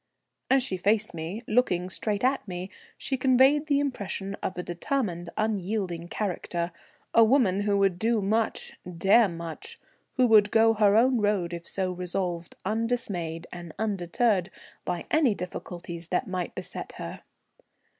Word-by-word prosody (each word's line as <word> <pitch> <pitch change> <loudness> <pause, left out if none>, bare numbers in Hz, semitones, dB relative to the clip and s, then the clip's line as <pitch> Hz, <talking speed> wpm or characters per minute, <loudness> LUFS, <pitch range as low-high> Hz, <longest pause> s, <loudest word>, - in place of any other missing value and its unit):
As 265 -1 +4
she 190 -7 -2
faced 210 +3 +1
me, 170 +8 -5
looking 200 -7 +2
straight 205 +3 -2
at 260 -3 +1
me, 180 +1 -5 0.3
she 265 - -2
conveyed 265 +4 +4
the 285 -2 +3
impression 200 -8 -3
of 185 - -3
a 180 - -2
determined 175 -2 -2
unyielding 195 -5 -1
character, 175 -3 -3 0.4
a 230 - +7
woman 220 -5 +3
who 205 0 +1
would 195 -3 +2
do 230 0 +2
much, 215 +3 0 0.2
dare 205 +6 +5
much, 170 - -7 0.4
who 255 - +3
would 215 -3 +6
go 225 +1 +5
her 210 -2 +4
own 250 +1 +4
road 205 -5 +1
if 170 0 -6
so 190 -1 -1
resolved, 180 -1 -3
undismayed 205 -7 -2
and 175 -2 -8
undeterred 195 -1 +1 0.4
by 175 - -3
any 290 -9 +4
difficulties 175 -2 -7
that 180 - -1
might 185 -2 -3
beset - - -5
her. - - -7
200 Hz, 145 wpm, -27 LUFS, 175-230 Hz, 0.4 s, a